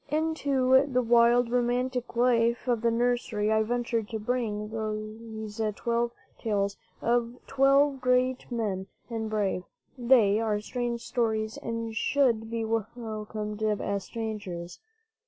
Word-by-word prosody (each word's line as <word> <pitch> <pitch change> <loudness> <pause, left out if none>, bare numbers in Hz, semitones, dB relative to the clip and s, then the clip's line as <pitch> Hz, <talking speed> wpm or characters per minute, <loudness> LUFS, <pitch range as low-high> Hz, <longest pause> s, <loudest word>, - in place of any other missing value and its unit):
Into 280 -4 +3
the 250 -2 +1
wild, 235 +1 +4
romantic 250 0 0
life 235 0 +2
of 240 -3 +1
the 235 - +3
nursery 230 -3 0
I 220 0 +4
venture 235 +1 0
to 220 +1 -5
bring 215 -2 -2
these 220 0 -5
twelve 235 +1 0 0.3
tales 200 -3 0 0.3
of 235 0 +1
twelve 275 0 +3
great 255 0 +1
men 200 -5 -2 0.2
and 220 -1 -2
brave. 205 -4 0 0.4
They 235 -4 +5
are 215 -2 0
strange 240 +2 -3
stories, 225 -2 -1
and 230 -1 -4
should 230 -4 +2
be 230 -1 -2
welcomed 220 -1 -4
as 205 -2 0
strangers. 205 -6 -5
230 Hz, 120 wpm, -28 LUFS, 215-245 Hz, 0.4 s, They